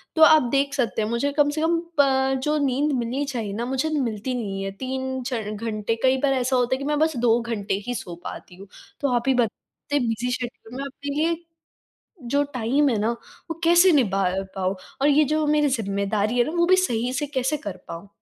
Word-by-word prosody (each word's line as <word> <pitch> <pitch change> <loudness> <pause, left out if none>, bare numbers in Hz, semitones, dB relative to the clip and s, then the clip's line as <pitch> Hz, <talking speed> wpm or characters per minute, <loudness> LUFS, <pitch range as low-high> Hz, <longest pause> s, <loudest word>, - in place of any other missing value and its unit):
तो 320 - +1
आप 315 -2 +8
देख 280 0 +1
सकते 245 -4 0
हैं, 215 - -1
मुझे 235 +5 0
कम 290 0 +4
से 310 +1 -2
कम 330 +1 +2 0.2
पं 265 -1 +3
जो 300 0 +1
नींद 275 +3 +1
मिलनी 250 +5 -2
चाहिए 230 -7 -4
ना 230 +4 -3
मुझे 265 +5 -1
मिलती 230 0 -2
नहीं 195 -5 -3
है। 195 - -3
3 260 0 -3
च 245 -4 -2
घंटे 215 0 -2
कई 260 0 +4
बार 270 - +3
ऐसा 255 0 0
होता 250 +1 +2
है - - -5
कि - - -5
मैं 295 0 0
बस 315 -1 +2
2 235 0 +3
घंटे 215 -4 -3
ही 245 - -1
सो 175 -6 -6
पाती 180 - -8
हूँ। 195 +2 -12 0.3
तो 280 -3 +1
आप 240 +2 -1
ही 265 - +5
बताइए 250 +4 -2
बिज़ी 235 +2 -1
शेड्यूल 245 -1 -6
में 275 - -3
अपने 280 +1 -6
लिए, 325 +3 +1 0.9
जो 280 +4 +1
टाइम 255 +5 +2
है 230 -5 +1
ना 220 +2 +1 0.4
वो 330 0 -5
कैसे 345 +2 +6
निभा 200 -9 +2
अ, 190 +2 -2
पाऊँ? 190 +1 -1 0.3
और 285 - +5
ये 295 +1 +5
जो 310 -1 +1
मेरी 295 -1 +3
ज़िम्मेदारी 210 -1 -1
है 240 - +5
ना 305 - -4
वो 340 - +3
भी 370 +1 +5
सही 250 -9 0
से 290 +3 -1
कैसे 275 +1 -1
कर 200 -9 -6
पाऊँ? 170 +4 -8
255 Hz, 225 wpm, -24 LUFS, 225-285 Hz, 0.9 s, आप